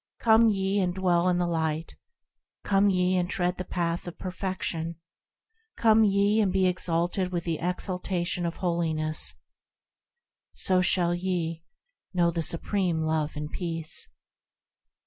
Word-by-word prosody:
Come 225 Hz, 0 st, +5 dB
ye, 195 Hz, 0 st, +1 dB
and 180 Hz, -2 st, 0 dB
dwell 180 Hz, -1 st, +2 dB
in 180 Hz, -, +2 dB
the 175 Hz, -, +1 dB
Light; 160 Hz, -1 st, -2 dB, 0.7 s
Come 200 Hz, 0 st, +3 dB
ye, 180 Hz, -1 st, +2 dB
and 175 Hz, -1 st, 0 dB
tread 180 Hz, -1 st, -1 dB
the -, -, -1 dB
Path 170 Hz, -1 st, -2 dB
of 175 Hz, -, -7 dB
Perfection; 185 Hz, -3 st, -3 dB, 0.8 s
Come 220 Hz, -1 st, +5 dB
ye, 205 Hz, +1 st, +3 dB
and 195 Hz, -3 st, +2 dB
be 190 Hz, 0 st, +2 dB
exalted 180 Hz, +1 st, 0 dB
with 175 Hz, -2 st, -2 dB
the 165 Hz, -2 st, -2 dB
exaltation 180 Hz, 0 st, -2 dB
of 170 Hz, -, -4 dB
Holiness, 160 Hz, -3 st, -1 dB, 1.2 s
So 185 Hz, -1 st, +2 dB
shall 175 Hz, -2 st, +2 dB
ye. 175 Hz, -2 st, -2 dB, 0.5 s
know 170 Hz, -1 st, +3 dB
the 165 Hz, 0 st, -2 dB
supreme 170 Hz, +1 st, -1 dB
Love 155 Hz, -1 st, -1 dB
and 150 Hz, +1 st, -5 dB
Peace. 165 Hz, -3 st, -2 dB
180 Hz, 135 wpm, -27 LUFS, 170-190 Hz, 1.2 s, Come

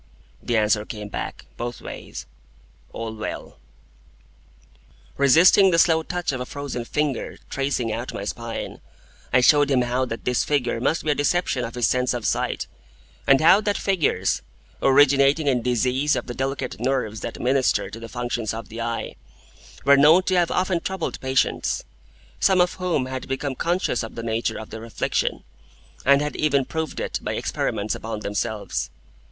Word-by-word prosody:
The 120 Hz, -, 0 dB
answer 105 Hz, -1 st, +2 dB
came 105 Hz, -1 st, -7 dB
back, -, -, -5 dB
both 120 Hz, 0 st, -4 dB
ways, -, -, -8 dB, 0.7 s
'All 115 Hz, -1 st, -5 dB
well.'" 110 Hz, -, -6 dB, 1.6 s
Resisting 165 Hz, +8 st, +6 dB
the 170 Hz, -, +2 dB
slow 165 Hz, -1 st, +4 dB
touch 175 Hz, 0 st, -2 dB
of 130 Hz, -2 st, -4 dB
a -, -, -3 dB
frozen 140 Hz, -4 st, -5 dB
finger 150 Hz, -1 st, -2 dB
tracing 135 Hz, -5 st, -1 dB
out 120 Hz, +3 st, -4 dB
my -, -, -5 dB
spine, 115 Hz, +2 st, -5 dB, 0.5 s
I 125 Hz, -, +5 dB
showed 145 Hz, +2 st, +5 dB
him 130 Hz, -3 st, +3 dB
how 125 Hz, +2 st, 0 dB
that 115 Hz, -2 st, -6 dB
this 125 Hz, -1 st, +2 dB
figure 125 Hz, -5 st, 0 dB
must 160 Hz, +6 st, +1 dB
be 155 Hz, -, +1 dB
a -, -, +4 dB
deception 145 Hz, -3 st, 0 dB
of 115 Hz, 0 st, -5 dB
his 120 Hz, -2 st, +2 dB
sense 125 Hz, 0 st, +1 dB
of 120 Hz, -, -4 dB
sight; -, -, 0 dB, 0.6 s
and 135 Hz, +1 st, +6 dB
how 185 Hz, +6 st, +6 dB
that 205 Hz, -1 st, 0 dB
figures, 155 Hz, -, +1 dB, 0.4 s
originating 140 Hz, +2 st, +5 dB
in 130 Hz, -4 st, +2 dB
disease 125 Hz, +4 st, +1 dB
of -, -, -3 dB
the 120 Hz, -, -5 dB
delicate 135 Hz, -6 st, -3 dB
nerves 120 Hz, -4 st, -1 dB
that -, -, -6 dB
minister 130 Hz, +1 st, +1 dB
to 115 Hz, -, -8 dB
the 115 Hz, 0 st, -9 dB
functions 120 Hz, -3 st, -3 dB
of 115 Hz, -, -7 dB
the 115 Hz, +1 st, -6 dB
eye, 115 Hz, 0 st, -3 dB, 0.7 s
were 140 Hz, 0 st, +7 dB
known 155 Hz, +6 st, +6 dB
to 185 Hz, -, 0 dB
have 175 Hz, -2 st, +3 dB
often 185 Hz, -1 st, +1 dB
troubled 190 Hz, 0 st, -4 dB
patients, 130 Hz, 0 st, 0 dB, 0.6 s
some 190 Hz, -2 st, +4 dB
of 180 Hz, 0 st, +3 dB
whom 180 Hz, -8 st, -1 dB
had 130 Hz, 0 st, -5 dB
become 135 Hz, +1 st, -2 dB
conscious 170 Hz, -3 st, 0 dB
of 115 Hz, -, -7 dB
the 115 Hz, -, -5 dB
nature 115 Hz, 0 st, -1 dB
of 110 Hz, -, -9 dB
their 110 Hz, -, -7 dB
affliction, 115 Hz, -, -1 dB, 0.6 s
and 140 Hz, +1 st, +5 dB
had 150 Hz, -, -3 dB
even 140 Hz, -3 st, +2 dB
proved 160 Hz, +1 st, -4 dB
it -, -, -2 dB
by -, -, -3 dB
experiments 105 Hz, +1 st, -2 dB
upon 110 Hz, -1 st, -5 dB
themselves. 105 Hz, +1 st, -3 dB
130 Hz, 170 wpm, -23 LUFS, 115-150 Hz, 1.6 s, were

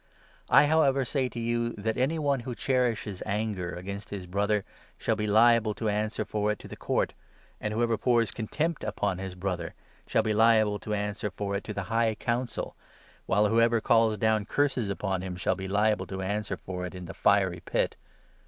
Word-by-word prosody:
I, -, -, +7 dB
however, 140 Hz, -3 st, +3 dB
say 130 Hz, 0 st, 0 dB
to 120 Hz, -, -6 dB
you 120 Hz, 0 st, -1 dB
that 110 Hz, +2 st, -2 dB
any 135 Hz, +6 st, +1 dB
one 140 Hz, -4 st, +1 dB
wTio 120 Hz, 0 st, -6 dB
cherishes 115 Hz, -7 st, 0 dB
anger 105 Hz, -4 st, -2 dB
against 100 Hz, +2 st, -6 dB
his 100 Hz, -3 st, -5 dB
brother 100 Hz, +2 st, 0 dB, 0.3 s
shall 110 Hz, -, 0 dB
be 105 Hz, 0 st, -2 dB
liable 110 Hz, 0 st, +4 dB
to 110 Hz, -1 st, -1 dB
answer 105 Hz, +1 st, -1 dB
for 105 Hz, 0 st, 0 dB
it 105 Hz, -, -3 dB
to -, -, -11 dB
the -, -, -8 dB
Court; -, -, -1 dB, 0.5 s
and 105 Hz, -, -3 dB
whoever 115 Hz, 0 st, +1 dB
pours 120 Hz, -2 st, +2 dB
contempt 150 Hz, +8 st, -2 dB
upon 100 Hz, -3 st, -1 dB
his 95 Hz, -1 st, -5 dB
brother 90 Hz, -2 st, -3 dB, 0.3 s
shall 110 Hz, -, +2 dB
be 110 Hz, -1 st, +1 dB
liable 110 Hz, -1 st, +4 dB
to 105 Hz, -, -3 dB
answer 105 Hz, 0 st, -2 dB
for 100 Hz, +1 st, -3 dB
it 100 Hz, -, -2 dB
to 105 Hz, -, -4 dB
the 100 Hz, -, -2 dB
High 115 Hz, -1 st, +2 dB
Council, 120 Hz, +3 st, -2 dB, 0.5 s
while 105 Hz, +1 st, +3 dB
whoever 115 Hz, +1 st, +3 dB
calls 115 Hz, -1 st, +3 dB
down 110 Hz, -2 st, +2 dB
curses 130 Hz, -3 st, 0 dB
upon 95 Hz, -1 st, -2 dB
him 95 Hz, -1 st, -5 dB
shall 90 Hz, -, 0 dB
be 95 Hz, 0 st, -5 dB
liable 105 Hz, +2 st, +1 dB
to 95 Hz, 0 st, -4 dB
answer 100 Hz, -1 st, -2 dB
for 90 Hz, 0 st, -6 dB
it 90 Hz, -, -10 dB
in 90 Hz, -1 st, -7 dB
the -, -, -7 dB
fiery 95 Hz, -4 st, +2 dB
Pit. -, -, -1 dB
105 Hz, 195 wpm, -28 LUFS, 100-115 Hz, 0.5 s, I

